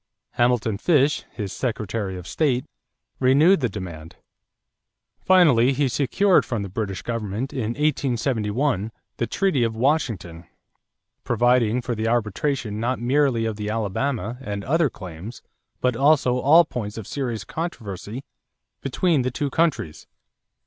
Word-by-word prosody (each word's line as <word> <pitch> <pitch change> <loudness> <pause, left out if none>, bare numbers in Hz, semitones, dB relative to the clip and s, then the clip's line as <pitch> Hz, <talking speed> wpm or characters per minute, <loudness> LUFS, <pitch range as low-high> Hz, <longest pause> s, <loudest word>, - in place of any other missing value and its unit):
Hamilton 120 -4 +1
Fish, 150 -2 +2
his 105 -5 -5
Secretary 105 -5 -3
of 90 - -9
State, 130 - 0 0.5
renewed 145 +9 +5
the 125 -5 0
demand. 85 -5 -8 1.0
Finally 145 -9 +5
he 140 +1 +1
secured 145 - +3
from 115 -5 -3
the 100 - -6
British 95 -2 -4
government 115 +4 -3
in 120 -4 -2
1871 125 -5 0 0.3
the 120 - -1
treaty 190 -10 +1
of 115 -1 -1
Washington 110 - -1 0.8
providing 120 -1 +2
for 120 - -2
the 110 0 -2
arbitration 115 0 -1
not 120 +2 0
merely 125 -1 +2
of 110 -2 -3
the 105 0 -4
Alabama 115 +2 -2
and 100 -5 -4
other 155 +4 +2
claims 95 +3 -9 0.4
but 125 -2 +1
also 135 -2 +3
all 160 +6 +6
points 110 -7 -5
of 110 - -6
serious 120 -6 -3
controversy 115 - -6 0.6
between 150 +2 +1
the 125 - 0
two 140 +3 -3
countries. 160 - -1
120 Hz, 130 wpm, -23 LUFS, 105-140 Hz, 1.0 s, all